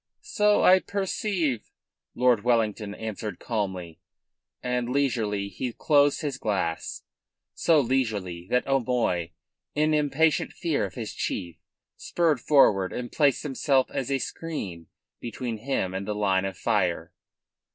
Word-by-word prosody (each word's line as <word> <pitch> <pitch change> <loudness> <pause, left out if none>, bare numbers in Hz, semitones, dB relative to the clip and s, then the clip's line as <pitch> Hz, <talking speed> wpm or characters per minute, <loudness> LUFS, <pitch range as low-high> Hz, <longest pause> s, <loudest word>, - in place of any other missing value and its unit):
"So 210 -1 +2
I 185 +1 +7
perceive," 185 - -2 0.5
Lord 125 -3 +3
Wellington 110 -3 0
answered 110 -3 -5
calmly, 95 -7 -4 0.6
and 125 -1 -1
leisurely 115 -7 0
he 115 +6 -4
closed 145 +1 +3
his 140 -4 -3
glass, 95 -6 -2 0.5
so 165 -3 +3
leisurely 110 -10 -1
that 125 - +2
O'Moy, 120 -10 0 0.5
in 155 +1 +2
impatient 150 +1 +2
fear 165 -5 -1
of - - -9
his 115 -4 -5
chief, 85 -4 -4 0.4
spurred 165 -4 +1
forward 100 -10 +4
and 120 -1 -5
placed 145 -4 +2
himself 135 -2 +1
as 130 - -3
a 135 - +2
screen 100 - -5 0.3
between 120 -1 -4
him 110 -7 -1
and 95 +1 -4
the 105 - -2
line 95 -2 +1
of 95 -1 -4
fire. - - 0
125 Hz, 130 wpm, -26 LUFS, 100-145 Hz, 0.6 s, I